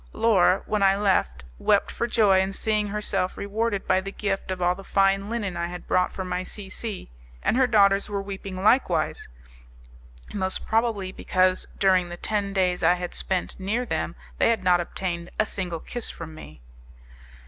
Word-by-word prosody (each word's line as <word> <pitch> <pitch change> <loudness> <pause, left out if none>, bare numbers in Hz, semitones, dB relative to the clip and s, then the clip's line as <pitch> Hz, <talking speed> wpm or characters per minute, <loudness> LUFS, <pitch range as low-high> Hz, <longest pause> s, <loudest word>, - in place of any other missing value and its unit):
Laura, 195 -4 +3
when 210 -1 -1
I 195 0 +5
left, 185 - +1 0.2
wept - - +2
for 235 - -2
joy 210 -5 +4
in 190 +1 0
seeing 210 0 0
herself 205 -2 -2
rewarded 205 0 -2
by 185 - +3
the 195 +1 -6
gift 195 -2 -3
of 185 -1 -3
all 175 0 +2
the 195 +2 -11
fine 195 +1 +2
linen 210 -6 -2
I 170 0 -2
had 180 0 -8
bought 180 0 +2
for 190 - -5
my 180 0 -2
C 195 0 -8
C, 210 - -5 0.3
and - - +2
her 260 0 +4
daughters 200 -3 +4
were 200 -1 -2
weeping 195 -1 -6
likewise, 245 +5 +2 1.1
most 190 -2 -1
probably 220 -4 0
because, 185 0 +1
during 185 -2 +3
the 175 - -7
ten 205 +1 -2
days 185 -2 +1
I 175 +2 +5
had 180 0 -5
spent 190 0 -2
near 215 +6 -1
them, - - -2 0.2
they - - +4
had 225 -5 +1
not 180 -1 +4
obtained 175 0 -4
a 215 - +4
single 180 -5 -4
kiss 240 +6 -5
from 160 -1 -8
me. 75 - -12
195 Hz, 180 wpm, -25 LUFS, 180-210 Hz, 1.1 s, I